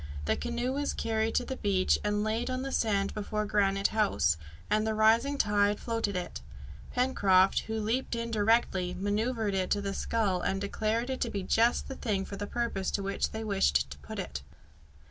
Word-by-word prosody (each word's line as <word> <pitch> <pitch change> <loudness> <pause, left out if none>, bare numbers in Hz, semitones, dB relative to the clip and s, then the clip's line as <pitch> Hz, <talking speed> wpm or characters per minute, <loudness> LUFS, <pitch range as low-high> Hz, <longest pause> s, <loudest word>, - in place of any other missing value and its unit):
The 75 - +2
canoe 240 - -2
was 285 +1 -1
carried 220 0 -1
to - - +2
the 265 - -5
beach 195 -2 +2
and 210 0 0
laid 220 +3 -1
on 255 0 -2
the 270 - -4
sand 200 -5 +1
before 210 0 -2
Granite 195 -1 +2
House, 200 - +2 0.3
and 215 +1 +1
the 220 - 0
rising 230 +6 +3
tide 205 -3 +2
floated 225 -4 -2
it. 180 - -4 0.5
Pencroft, 195 -7 +3
who 220 0 -2
leapt 230 +4 -1
in 230 0 -3
directly, 205 -4 +2
manoeuvred 210 +2 -1
it 190 0 +1
with 205 - -4
the 200 0 -2
scull 195 -4 0
and 195 - -1
declared 220 +5 -1
it 260 - -4
to - - 0
be 200 -2 -3
just 230 +5 +2
the - - -5
thing 205 -7 -2
for 200 - -7
the 205 +1 -5
purpose 230 -6 -2
to 200 - -2
which 195 0 -1
they 220 0 -5
wished 70 - +1
to 70 - -9
put 70 - -8
it. 70 0 -4
210 Hz, 195 wpm, -30 LUFS, 195-230 Hz, 0.5 s, rising